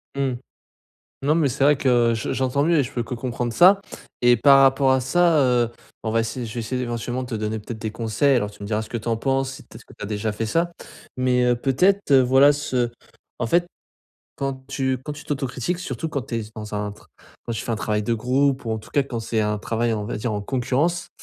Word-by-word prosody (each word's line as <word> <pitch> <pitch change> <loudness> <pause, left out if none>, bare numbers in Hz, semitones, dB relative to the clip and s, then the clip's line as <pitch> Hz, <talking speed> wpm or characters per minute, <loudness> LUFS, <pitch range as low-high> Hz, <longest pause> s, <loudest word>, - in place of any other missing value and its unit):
Mmh. 135 -2 0 0.9
Non 145 +3 +2
mais 160 -3 +2
c'est 135 +2 0
vrai 145 +1 +5
que 120 -3 +3
je 110 - -3
j'entends 130 +1 0
mieux 165 0 +3
et - - +4
je 125 - -8
peux 120 - -1
que 115 - -5
comprendre 120 0 -3
ça 185 - +6 0.4
et 120 0 +6
par 135 +4 +6
rapport 135 0 +4
à 130 - +3
ça, 165 +5 +3
heu, 125 -3 +3
ben, 115 - -12 0.3
on 110 - -1
va 115 - +3
essayer 115 +2 -3
je 110 - -8
vais 120 - -2
essayer 125 +3 -3
éventuellement 120 +1 -3
de - - -10
te - - -3
donner 110 0 -2
peut-être 110 +2 -7
des 110 0 -4
conseils 115 +5 +1
alors 105 -4 -1
tu 100 - -14
me - - -5
diras 110 0 0
ce 110 - -10
que - - -4
tu 115 +1 -5
en 115 - +1
penses, 135 +2 0
si - - -11
peut-être - - -14
que - - -17
tu - - -9
as - - -4
déjà 105 +1 -2
fait 110 +2 -3
ça, 170 +8 0 0.4
mais 125 -1 +2
heu, 125 -1 +3
peut-être, 180 +10 +2
heu, 135 - +8
voilà 135 +3 +6
ce 130 -4 -1 0.5
en 120 - 0
fait 175 +8 +2 0.7
quand 135 -1 -4
tu 130 -1 -1
quand 150 - -5
tu 150 - -11
t'autocritiques 135 +4 -2
surtout 160 -3 -4
quand 140 -3 -2
tu 115 - -5
es - - 0
s 110 -1 -8
dans 105 -1 -7
un 105 0 -2
tr 105 - -17 0.4
quand - - -4
tu 115 - -4
fais - - -3
un - - 0
travail 105 0 -1
de 115 - 0
groupe 130 +4 +1
ou 115 - -2
en 110 - -1
tout 110 - -12
cas, 140 - +2
quand 125 -3 -5
c'est 110 0 -1
un 105 0 0
travail 115 +3 -1
en 105 - -2
on - - -5
va 110 - -4
dire 110 +1 -2
en 105 - -2
concurrence, 135 +9 0
125 Hz, 265 wpm, -23 LUFS, 115-135 Hz, 0.9 s, heu